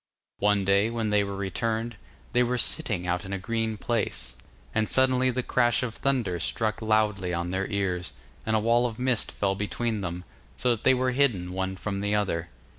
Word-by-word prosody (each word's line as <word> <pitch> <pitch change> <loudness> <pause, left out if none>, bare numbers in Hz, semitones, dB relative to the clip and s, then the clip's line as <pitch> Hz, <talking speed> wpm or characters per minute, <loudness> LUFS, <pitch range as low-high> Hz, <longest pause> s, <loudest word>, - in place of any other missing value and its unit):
One 105 -1 +2
day, 100 +3 +3
when 115 -2 -1
they 105 -1 +4
were 100 0 -4
returned, 110 +4 -2 0.4
they 125 - +4
were 125 0 +1
sitting 115 - +1
out 90 0 -1
in 95 - -7
a 100 - -1
green 110 +2 -2
place, 100 - -2 0.4
and 110 -1 +1
suddenly 130 0 +4
the 125 0 -1
crash 120 -1 +2
of 120 -3 -3
thunder 120 -11 0
struck 110 +6 -1
loudly 105 -5 +1
on 85 +1 -2
their 95 +1 -1
ears, 95 -3 -2 0.3
and 110 - 0
a - - +4
wall 120 +3 +3
of 115 -2 -7
mist 125 -3 0
fell 100 -1 0
between 105 +2 -2
them, 90 -1 -4 0.3
so 125 - +2
that 115 - -1
they 130 - +6
were 130 0 +1
hidden 115 -10 +1
one 95 0 -2
from 100 +1 -3
the 100 +1 0
other. 90 -5 -1
105 Hz, 195 wpm, -27 LUFS, 95-120 Hz, 0.4 s, they